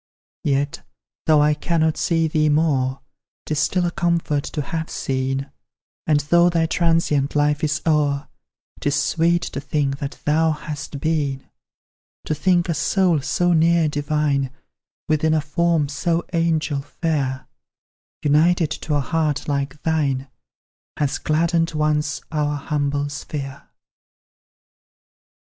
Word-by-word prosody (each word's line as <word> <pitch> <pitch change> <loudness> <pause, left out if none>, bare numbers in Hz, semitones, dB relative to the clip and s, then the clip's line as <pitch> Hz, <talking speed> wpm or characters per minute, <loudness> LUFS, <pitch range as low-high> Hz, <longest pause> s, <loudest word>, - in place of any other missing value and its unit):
Yet, 140 0 0 0.5
though 155 -2 +5
I 150 0 +4
cannot 160 +1 0
see 165 -1 +1
thee 155 -1 +2
more, 140 -4 +1 0.4
'Tis 155 -1 -1
still 180 +2 +1
a 175 - 0
comfort 165 -3 0
to 150 - -3
have 160 +2 -4
seen; 135 +1 -2 0.6
And 150 -2 +3
though 170 +4 +4
thy 165 -1 +1
transient 165 -4 +1
life 150 0 +2
is 150 0 0
o'er, 145 -3 +1 0.5
'Tis 145 0 0
sweet 170 +3 +2
to - - -4
think 140 -3 -1
that 140 -1 -5
thou 160 +2 +3
hast 150 -1 -6
been; 145 -4 -1 0.8
To - - 0
think 175 +3 +2
a 170 - +1
soul 175 0 +2
so 175 +5 +1
near 165 0 +4
divine, 145 -2 0 0.6
Within 155 +1 +2
a - - +3
form 160 +1 +1
so 165 +4 -1
angel 160 -4 +1
fair, 135 -3 -2 0.8
United 155 +2 +3
to 155 -1 -2
a 145 - +2
heart 150 -1 -1
like 140 0 -2
thine, 140 -4 0 0.7
Has 145 -2 0
gladdened 165 +1 +1
once 150 -1 0
our 150 -2 0
humble 145 -1 -1
sphere. 140 -1 -6
150 Hz, 125 wpm, -22 LUFS, 145-165 Hz, 0.8 s, though